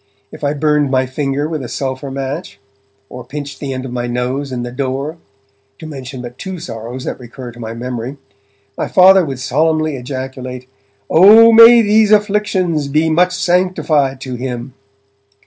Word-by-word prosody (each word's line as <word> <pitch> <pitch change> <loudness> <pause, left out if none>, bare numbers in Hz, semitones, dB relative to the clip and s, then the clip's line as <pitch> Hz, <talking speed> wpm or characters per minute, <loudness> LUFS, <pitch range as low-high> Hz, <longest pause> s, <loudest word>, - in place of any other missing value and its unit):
If - - -12
I 145 +1 0
burned 150 -1 +1
my 130 -1 +1
finger 135 +2 -2
with 155 -4 -4
a - - -6
sulphur 130 +1 -4
match, 135 - -5 0.5
or 125 - -9
pinched 140 +2 -7
the 140 -2 -5
end 130 0 -5
of 130 - -7
my 120 -1 -3
nose 125 +3 -3
in 125 -1 -4
the 120 - -6
door 135 +4 -3 0.6
(to 160 - -10
mention 135 -4 -8
but 120 +1 -10
two 190 -1 -6
sorrows 120 -2 -7
that - - -5
recur 125 0 -9
to 120 - -15
my 115 -1 -6
memory), 125 +2 -5 0.6
my - - -3
Father 190 0 +6
would 135 -5 -4
solemnly 155 +4 0
ejaculate: 130 0 -7 0.4
'Oh 215 +7 +7
may 230 +1 +8
these 215 0 +3
afflictions 205 -7 +1
be 155 +3 +1
much 180 +3 +2
sanctified 175 -7 0
to 130 -1 -6
him!' 125 0 -5
140 Hz, 165 wpm, -16 LUFS, 125-165 Hz, 0.6 s, may